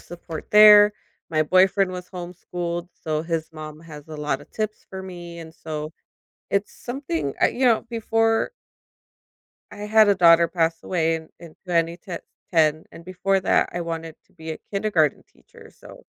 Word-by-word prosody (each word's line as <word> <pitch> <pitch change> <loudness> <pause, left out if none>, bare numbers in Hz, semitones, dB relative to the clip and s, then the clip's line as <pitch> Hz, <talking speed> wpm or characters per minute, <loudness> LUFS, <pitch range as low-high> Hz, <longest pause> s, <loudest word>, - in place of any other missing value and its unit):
support 170 -2 -9
there. 210 0 +8 0.4
My 155 -1 +2
boyfriend 185 +3 +3
was 180 -1 -7
homeschooled, 175 -1 -5
so 155 -1 -3
his 165 -1 -3
mom 155 -1 -9
has 150 -2 -12
a 155 - -7
lotta 150 0 -3
tips 215 -1 -5
for 190 0 -6
me, 175 -2 -9
and 160 -1 -10
so 155 0 -6 0.6
it's 200 +1 0
something, 170 - -4
I - - +5
you 260 - -2
know, 235 -3 +4
before 225 - +1 1.2
I - - -10
had 215 0 +5
a 200 - +5
daughter 170 -1 +6
pass 165 -1 0
away 165 -2 0
in 160 -1 -6
in 165 -2 -13
twenty 170 -2 0
t 180 -2 -7 0.3
ten 155 -2 +2
and 165 - -13
before 185 +2 0
that, 190 - +2
I 175 - -3
wanted 165 -1 -5
to - - -32
be 160 -3 -9
a 155 - -5
kindergarten 195 -8 +1
teacher, - - -18
so - - -15
170 Hz, 165 wpm, -23 LUFS, 160-195 Hz, 1.2 s, there